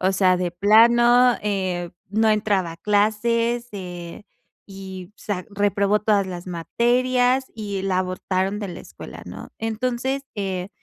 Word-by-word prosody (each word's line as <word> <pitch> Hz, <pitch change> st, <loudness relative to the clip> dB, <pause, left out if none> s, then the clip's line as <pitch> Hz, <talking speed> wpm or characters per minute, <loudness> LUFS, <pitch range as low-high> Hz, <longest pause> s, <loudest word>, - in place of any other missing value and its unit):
O 190 Hz, +1 st, +2 dB
sea, 185 Hz, -1 st, +3 dB
de 180 Hz, -1 st, -1 dB
plano, 235 Hz, +5 st, +5 dB
eh, 185 Hz, -4 st, -2 dB, 0.2 s
no 220 Hz, +2 st, +3 dB
entraba 205 Hz, -4 st, +1 dB
a -, -, -12 dB
clases, 230 Hz, +4 st, +1 dB
eh, 180 Hz, -1 st, -7 dB, 0.4 s
y, 190 Hz, -2 st, -9 dB
o -, -, -43 dB
sea, 185 Hz, -4 st, -4 dB
reprobó 200 Hz, 0 st, +1 dB
todas 210 Hz, -2 st, +2 dB
las 180 Hz, -1 st, -7 dB
materias, 245 Hz, +8 st, +1 dB
y 205 Hz, -3 st, -4 dB
la 190 Hz, -1 st, 0 dB
abortaron 185 Hz, +2 st, -2 dB
de 205 Hz, -, -4 dB
la 175 Hz, -, -7 dB
escuela, -, -, -11 dB
¿no? -, -, -9 dB
Entonces, 250 Hz, +4 st, -2 dB
eh, 190 Hz, -2 st, -3 dB
205 Hz, 145 wpm, -23 LUFS, 185-230 Hz, 0.4 s, plano